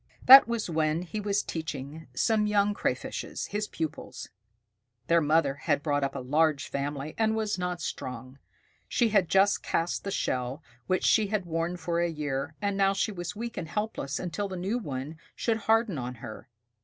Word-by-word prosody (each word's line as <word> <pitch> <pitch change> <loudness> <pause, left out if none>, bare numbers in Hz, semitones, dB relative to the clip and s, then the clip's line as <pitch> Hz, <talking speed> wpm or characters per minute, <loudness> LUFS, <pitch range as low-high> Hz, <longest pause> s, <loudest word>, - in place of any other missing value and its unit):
That 270 0 +11
was 235 -2 -2
when 160 0 0
he 180 +4 -5
was 205 0 0
teaching 160 -1 -6
some 210 - +2
young 205 0 +2
Crayfishes, - - -3
his 210 0 -2
pupils. 160 -2 -5 0.8
Their 170 +3 +4
mother 150 -2 +3
had 145 +1 -1
brought 145 -2 +1
up 135 0 -2
a - - -3
large 150 +2 +1
family, 140 +1 -3
and 220 0 +2
was 215 -3 -1
not 180 -1 -2
strong. 130 +2 -6 0.5
She 235 -2 +2
had 200 -5 +3
just 195 +1 +4
cast 165 +1 -1
the 200 - -3
shell 130 -4 -2 0.2
which 185 - +1
she 215 -2 +4
had 205 -2 -1
worn 165 +1 -2
for 170 0 -1
a 170 0 +1
year, 150 -2 -3
and 200 -1 0
now 195 0 +3
she 205 +2 0
was 175 -1 -5
weak 235 +2 -5
and 165 - -3
helpless 175 -7 -3
until 185 +3 -3
the 190 -1 -6
new 195 +7 -1
one 145 - -5 0.2
should 230 -2 0
harden 220 - +2
on 125 0 -5
her. 115 +1 -10
170 Hz, 180 wpm, -28 LUFS, 145-205 Hz, 0.8 s, That